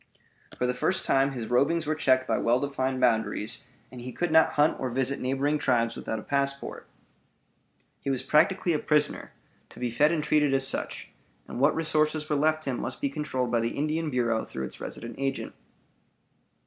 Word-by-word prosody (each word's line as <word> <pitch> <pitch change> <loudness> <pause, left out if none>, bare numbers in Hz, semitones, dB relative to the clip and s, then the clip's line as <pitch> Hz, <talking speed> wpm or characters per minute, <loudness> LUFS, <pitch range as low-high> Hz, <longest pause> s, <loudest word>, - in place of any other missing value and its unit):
For 125 - 0
the 125 - +1
first 185 +9 -1
time 135 +1 +3
his 120 -4 -4
rovings 145 +8 +2
were 155 - 0
checked 130 -4 +2
by - - +1
well 120 +2 +2
defined 130 -2 -2
boundaries, 110 -2 +1 0.2
and 125 - -9
he 125 +1 -6
could 175 +6 -2
not 160 0 +5
hunt 150 +1 +2
or 130 - -2
visit 130 +2 -1
neighboring 135 +4 0
tribes 115 -4 +1
without 110 - -4
a 110 - -7
passport. 140 0 -2 1.1
He - - -4
was 130 -2 -1
practically 175 +3 +3
a 150 - 0
prisoner, 150 -1 +1 0.4
to - - -14
be 125 -1 -2
fed 145 +7 +3
and 160 -3 0
treated 150 -2 +2
as 135 0 +3
such; - - -3 0.4
and - - -6
what 140 +3 +4
resources 155 -1 +1
were 150 - 0
left 155 +2 +1
him 130 -3 -2
must 130 - -5
be 140 - 0
controlled 135 -4 -2
by 120 - +2
the 115 +1 -2
Indian 155 +2 -1
Bureau 120 -4 0
through 65 - -5
its - - -9
resident 115 - -7
agent. 135 0 -2
135 Hz, 190 wpm, -27 LUFS, 125-150 Hz, 1.1 s, not